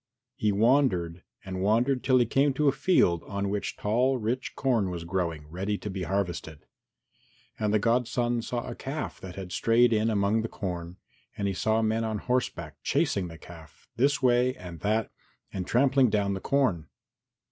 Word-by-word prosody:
He 105 - +1
wandered 100 -7 +2 0.2
and 95 -1 -4
wandered 120 +6 +2
till 130 -1 +4
he 120 - +4
came 135 +4 +2
to 150 +2 +2
a - - +6
field 135 - +2
on 100 0 -2
which 105 0 -3
tall 125 +5 +1
rich 120 +3 -3
corn 115 -8 +1
was 85 -2 -5
growing, 85 -4 -3
ready 95 +6 -3
to 105 - -6
be 95 0 -5
harvested. 90 -5 -3 0.9
And 105 -1 0
the 110 - +4
godson 120 +1 +1
saw 120 +1 -4
a - - -4
calf 140 +3 -5
that 90 -2 -8
had 95 -2 -7
strayed 115 +5 +3
in 110 +1 +2
among 105 +1 +2
the 115 - -3
corn 90 -2 -5 0.4
and 100 - -1
he 100 - -1
saw 110 +4 +1
men 110 +1 +1
on 110 -1 -2
horseback 125 +3 -2
chasing 95 -3 0
the 80 -1 -10
calf 80 -2 -14
this 135 +1 +2
way 125 +1 +3
and 85 -2 -9
that 110 +1 0 0.4
and 95 -2 -4
trampling 130 0 +4
down 100 -1 +1
the 95 - -4
corn. 105 - +1
105 Hz, 180 wpm, -27 LUFS, 95-125 Hz, 0.9 s, a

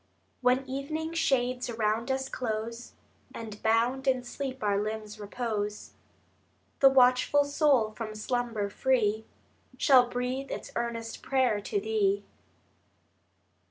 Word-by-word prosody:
) - - -42
I - - -42
When 255 +1 +2
evening 310 +5 -4
shades 255 -6 +1
around 225 +1 -1
us 265 0 -1
close, 230 -1 -4 0.4
And 215 -2 -8
bound 240 +5 +1
in 255 -2 +2
sleep 260 0 -5
our 205 -1 +2
limbs 215 0 -5
repose, 210 -1 -4 0.9
The 270 - +8
watchful 255 +2 +4
soul, 285 -6 +3
from 215 -1 -6
slumber 230 -1 -2
free, 220 -4 +1 0.5
Shall 255 -5 +6
breathe 250 +2 -3
its - - -6
earnest 230 -1 -3
prayer 255 -6 +1
to 405 - -1
Thee. 405 -1 +1
245 Hz, 125 wpm, -29 LUFS, 220-265 Hz, 0.9 s, The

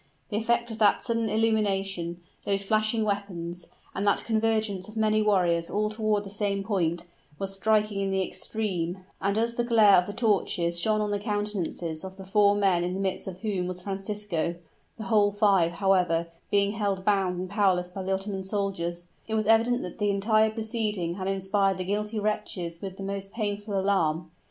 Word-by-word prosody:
The 210 - -1
effect 235 +1 +1
of 225 - -7
that 210 - +4
sudden 230 -2 0
illumination 195 -6 0 0.2
those 195 0 0
flashing 215 +2 +1
weapons 180 -4 -3 0.3
and 195 +2 -2
that 200 - +2
convergence 220 -4 0
of 215 +1 -10
many 215 0 +3
warriors 175 -5 +2
all 210 0 0
toward 215 -1 0
the 195 - -9
same 200 -1 -1
point, 175 -4 -1 0.3
was 195 0 -3
striking 210 0 +1
in 195 - 0
the 190 0 +1
extreme, 185 -5 -3 0.2
and 200 +2 +1
as 230 +1 +1
the 240 - 0
glare 220 -4 +6
of 180 - -3
the 205 - -5
torches 195 -6 +1
shone 215 +4 +1
on 210 -1 -1
the 205 - 0
countenances 205 -6 -3
of 190 0 -8
the 195 - -8
four 205 +1 +4
men 190 -4 +2
in 180 +1 -2
the - - -3
midst 195 -1 -2
of 185 0 -7
whom 195 -5 -1
was 180 0 -5
Francisco 195 -3 -2 0.4
(the 220 - -6
whole 205 0 +3
five, 200 -5 +3
however, 180 -3 +2 0.2
being 200 0 +3
held 200 -3 -2
bound 195 -3 +2
and 185 - -3
powerless 180 -3 +2
by 190 - -5
the 190 +1 -3
Ottoman 195 0 -2
soldiers), 190 -3 -3 0.2
it 220 - -1
was 215 -1 +1
evident 230 +3 +3
that 180 +5 -8
the 205 -1 +1
entire 215 +2 +3
proceeding 215 -5 -2
had 190 +1 -4
inspired 195 0 +1
the 185 - -2
guilty 210 +3 -2
wretches 205 -5 -2
with 190 -1 -6
the 195 - -6
most 195 0 -4
painful 205 -2 -2
alarm. 170 -4 0
200 Hz, 190 wpm, -27 LUFS, 185-215 Hz, 0.4 s, glare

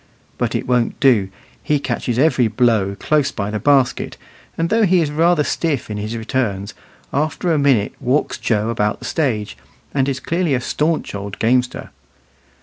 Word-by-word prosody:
But - - -1
it - - -2
won't 125 -2 0
do; 115 -9 +4 0.3
he 150 -1 +1
catches 120 -3 -2
every 135 -4 +3
blow 110 -3 +1
close 150 -2 +2
by 100 -1 -3
the 105 - -2
basket, 135 -2 +2 0.4
and 165 0 0
though 225 +1 +3
he 185 -2 +4
is 155 -3 0
rather 165 +1 +3
stiff 145 -8 -2
in 105 - -3
his 105 +3 -4
returns, 110 -4 -2 0.4
after 155 +4 0
a 155 - +2
minute 135 -8 +2
walks 135 +2 0
Joe 110 -1 0
about 105 -2 0
the - - -10
stage, 110 - -1 0.4
and 135 -1 +1
is 130 -1 -2
clearly 170 0 0
a - - 0
stanch 155 +5 -1
old 100 0 -6
gamester. 125 +2 0
130 Hz, 170 wpm, -19 LUFS, 110-150 Hz, 0.4 s, do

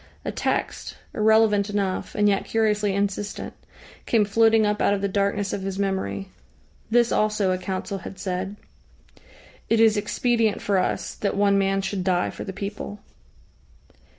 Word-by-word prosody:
A - - -1
text, - - -2 0.2
irrelevant 215 -1 +3
enough, 200 -2 -2
and 210 0 +3
yet 200 -1 +1
curiously 210 -3 +1
insistent, 200 +1 -2 0.5
came 220 -3 +3
floating 225 +1 +4
up 210 0 0
out 205 - +3
of 195 - -4
the 200 - +1
darkness 200 +1 0
of 200 - -3
his 195 0 -4
memory. 145 - -2 0.6
This 235 +1 +3
also 210 -3 +1
a 185 - -1
Council 190 +1 -4
had 185 - -9
said: 190 +1 -3 1.1
"It 225 - +3
is 220 -1 +5
expedient 220 +1 +1
for 200 -2 +1
us 185 - -2
that 200 -1 -2
one 200 -1 +4
man 195 0 +1
should 195 -1 -2
die 180 -1 +1
for - - -7
the 195 - -5
people." 205 +1 -6
200 Hz, 155 wpm, -24 LUFS, 195-215 Hz, 1.1 s, is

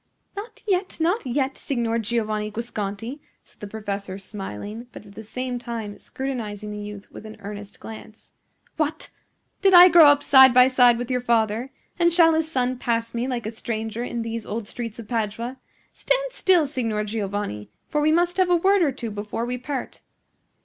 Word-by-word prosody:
"Not 410 +4 -8
yet, 375 -2 0
not 340 - 0
yet, 265 +1 0
Signor 235 -4 -1
Giovanni 215 -2 -1
Guasconti," 225 +3 -5 0.2
said - - -24
the 205 - -7
professor, 200 -2 -5
smiling, 205 - -7
but - - -11
at 200 - -14
the 220 - -9
same 250 +3 -4
time 230 -4 -6
scrutinizing 220 -6 -5
the 210 - -6
youth 205 -1 -9
with - - -10
an 215 0 -10
earnest 205 0 -9
glance. 220 0 -11 0.5
"What! 310 0 -2 0.5
did 390 -1 +5
I 355 +1 +11
grow 330 -3 +8
up 290 0 +5
side 265 -2 +7
by 250 +1 +7
side 245 -2 +5
with 245 +2 -4
your 250 -1 0
father? 230 +1 +1 0.3
and 340 0 +4
shall 330 -1 +5
his 320 0 0
son 255 -2 0
pass 230 -2 -1
me 235 +2 -2
like 245 -3 -3
a 220 - -3
stranger 225 0 -4
in 240 -1 -3
these 230 0 -4
old 215 0 -5
streets 230 0 -6
of 230 -3 -9
Padua? 230 +3 -3 0.4
Stand - - 0
still, 365 -9 +3
Signor 230 -7 -2
Giovanni; 200 - -4 0.2
for 300 - 0
we 305 +1 +3
must 350 +2 +2
have 370 -1 +3
a 355 - +5
word 390 +3 +3
or 305 -5 +3
two 240 -4 -6
before 210 +3 -4
we 250 +1 -3
part." 265 +1 -5
235 Hz, 185 wpm, -24 LUFS, 215-275 Hz, 0.5 s, I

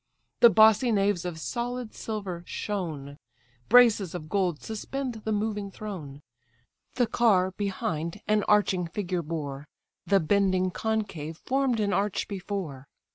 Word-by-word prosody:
The 235 - +9
bossy 220 +3 +5
naves 200 -4 +1
of 170 -3 -4
sold 240 +3 -4
silver 195 -6 -5
shone; 155 -9 -4 0.5
Braces 225 -7 +5
of 155 -3 -7
gold 185 -6 0
suspend 240 +2 -4
the 220 - -1
moving 210 -1 -1
throne: 165 -9 -8 0.7
The 245 - +3
car, 210 -6 +3
behind, 180 -3 -3
an 210 -1 +2
arching 195 -4 +3
figure 180 0 -2
bore; 150 -3 -5 0.4
The 200 -1 +4
bending 185 +1 +2
concave 195 -8 -3
form'd 265 -3 +1
an 205 -2 +1
arch 200 +2 0
before. 185 -9 -5
200 Hz, 130 wpm, -27 LUFS, 170-220 Hz, 0.7 s, The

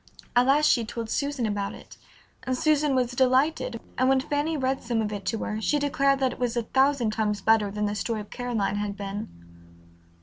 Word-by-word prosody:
At 245 +1 +4
last 295 +3 +4
she 240 -5 +4
told 225 0 -5
Susan 280 -4 -1
about 205 -2 -2
it, - - -14 0.5
and 255 -1 -2
Susan 300 -1 +2
was 250 -1 +1
delighted, 255 0 +1 0.2
and 255 +1 +3
when 270 0 +4
Fanny 295 +3 -1
read 265 0 -1
some 235 -1 -1
of 210 -1 -1
it 200 -1 -6
to 225 - 0
her 215 0 -3
she 295 - +1
declared 275 -1 +2
that 260 -1 +2
it - - -13
was 245 -1 -1
a 235 - +1
thousand 265 -1 +2
times 210 -2 0
better 220 -2 +3
than 210 +1 -2
the 205 - -1
story 215 +1 -2
of 210 - -13
Caroline 225 -5 -2
had 205 -1 -3
been. 200 0 -5
245 Hz, 210 wpm, -26 LUFS, 215-270 Hz, 0.5 s, At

